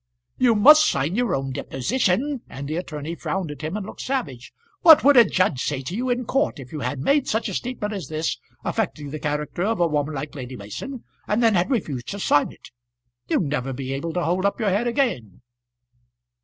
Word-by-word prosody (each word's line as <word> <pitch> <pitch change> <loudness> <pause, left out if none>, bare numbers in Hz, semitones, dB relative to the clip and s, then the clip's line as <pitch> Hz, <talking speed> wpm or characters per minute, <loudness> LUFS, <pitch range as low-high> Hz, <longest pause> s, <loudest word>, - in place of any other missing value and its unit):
"You 245 -3 +4
must 300 +9 +8
sign 145 +6 -1
your 240 -4 +1
own 135 0 -3
deposition;" 245 - -1
and 140 +1 -7
the 155 - -3
attorney 160 -2 -5
frowned 175 -1 -3
at 145 -1 -9
him 160 +6 -3
and 205 - -5
looked - - -9
savage. 185 - -3 0.3
"What 320 -2 +8
would 285 +1 +6
a 240 - +9
judge 185 - +1
say 135 -2 -2
to 170 +8 -5
you 250 +3 -2
in 245 0 0
court 270 - 0
if 130 -2 -10
you 155 - -5
had 140 - -2
made 280 - +2
such 220 +2 0
a - - -4
statement 235 -4 -3
as 195 -3 -5
this, 155 0 -2 0.3
affecting 145 -2 -2
the 155 - -5
character 150 +3 -3
of 220 +2 0
a 175 - +4
woman 150 -1 -1
like 145 +2 -5
Lady 130 -3 -7
Mason, 120 - -7 0.2
and 215 +3 +1
then 225 -1 +5
had 180 -1 +2
refused 145 - -2
to 200 - -5
sign 145 -6 +2
it? - - -16 0.6
You'd - - +2
never 135 -3 -2
be 135 +1 -4
able 165 +5 -3
to 180 - -1
hold 180 +3 0
up 200 +3 0
your 215 -3 +1
head 210 +6 +1
again." 135 - -1
175 Hz, 215 wpm, -23 LUFS, 140-230 Hz, 0.6 s, a